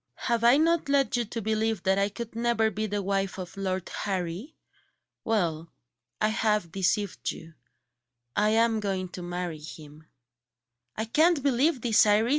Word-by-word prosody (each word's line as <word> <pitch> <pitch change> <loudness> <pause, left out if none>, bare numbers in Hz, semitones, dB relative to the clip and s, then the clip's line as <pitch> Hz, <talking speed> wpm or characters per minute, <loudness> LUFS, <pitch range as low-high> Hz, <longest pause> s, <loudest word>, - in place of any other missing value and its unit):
Have 235 -1 +1
I 240 +3 +6
not 330 -1 +2
led 275 -2 +2
you 240 -1 0
to 225 +1 -5
believe 220 0 0
that 190 0 +2
I 200 +1 +2
could 225 +2 -7
never 230 -1 +1
be 215 +2 -2
the 205 0 -2
wife 195 0 -1
of 180 -2 -7
Lord 190 -2 -2
Harry? 190 - -3 0.7
Well, 170 -7 -1 0.5
I 215 - +2
have 215 -5 0
deceived 195 +2 -1
you 165 0 -8 0.8
I 210 +1 +3
am 225 0 +3
going 190 -3 -2
to 180 - -8
marry 175 -2 -4
him." 150 0 -11 0.9
"I 220 - -1
can't 310 +5 +3
believe 270 0 +2
it, 225 -2 +5
Iris! 210 +3 +3
210 Hz, 160 wpm, -27 LUFS, 185-235 Hz, 0.9 s, I